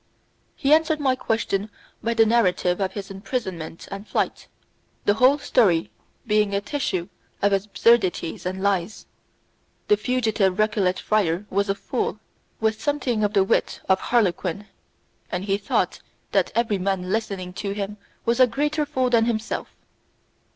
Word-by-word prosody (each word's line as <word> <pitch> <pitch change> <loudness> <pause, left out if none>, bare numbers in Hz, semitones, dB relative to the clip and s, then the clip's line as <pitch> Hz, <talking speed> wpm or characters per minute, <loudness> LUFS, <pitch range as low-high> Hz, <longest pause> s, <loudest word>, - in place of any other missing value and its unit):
He 280 +2 +3
answered 315 0 +3
my 265 -3 +2
question 220 -4 -1 0.3
by 230 +1 -1
the 225 -1 +5
narrative 185 -5 +2
of 190 -1 -1
his 200 -1 -6
imprisonment 190 -6 -5
and 200 +2 -7
flight, - - -2 0.6
the 205 - +4
whole 255 +6 +5
story 195 - +2 0.3
being 210 -2 +2
a - - +2
tissue 200 - -2 0.3
of 200 0 +2
absurdities 195 -3 +2
and 190 +1 -4
lies. 200 0 -1 0.8
The 210 - +5
fugitive 215 -5 +1
Recollet 205 -4 +2
friar 195 -3 0
was 200 +1 +1
a 195 - +2
fool, 230 -1 -3 0.4
with 220 -1 0
something 275 -7 0
of 205 0 +1
the 195 -2 +4
wit 195 - 0
of 190 0 +4
harlequin, 200 -4 0 0.7
and 180 +2 -2
he 200 0 0
thought 205 - 0 0.3
that - - +2
every 225 -4 +1
man 185 -1 -1
listening 195 -4 -2
to 200 -1 -2
him 205 0 -4 0.3
was 235 +2 +1
a 255 - +7
greater 295 +5 -1
fool 260 -3 0
than 230 -2 +4
himself. 225 -1 -2
210 Hz, 150 wpm, -24 LUFS, 190-235 Hz, 0.8 s, a